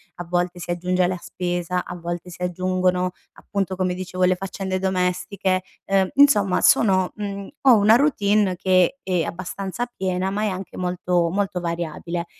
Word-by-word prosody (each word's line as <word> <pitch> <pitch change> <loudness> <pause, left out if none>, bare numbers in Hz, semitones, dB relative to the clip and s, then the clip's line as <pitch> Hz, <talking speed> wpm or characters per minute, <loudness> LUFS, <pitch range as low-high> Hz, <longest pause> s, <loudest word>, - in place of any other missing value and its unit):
a 175 - -7
volte 175 +1 -1
si 175 - -8
aggiunge 180 +1 +1
la 185 0 -2
spesa, 175 0 -2
a 180 - -7
volte 175 +1 -5
si 180 - -12
aggiungono 185 0 0 0.2
appunto, 195 -2 -3
come 185 -1 0
dicevo, 185 0 -3
le 185 0 +3
faccende 190 0 -4
domestiche, 185 0 0 0.2
ehm 195 -1 +2
insomma 210 -10 +5
sono, 185 -4 +4
mhmm, 200 -2 -5
ho 255 -4 +7
una 210 +2 +6
routine 210 -8 +2
che 185 +7 +2
è 180 -3 0
abbastanza 190 +5 -4
piena 190 -4 -2
ma 210 +2 -1
è - - +1
anche 190 0 -6
molto 180 -1 0
molto 195 -2 -1
variabile. 170 0 -3
185 Hz, 160 wpm, -23 LUFS, 180-195 Hz, 0.2 s, ho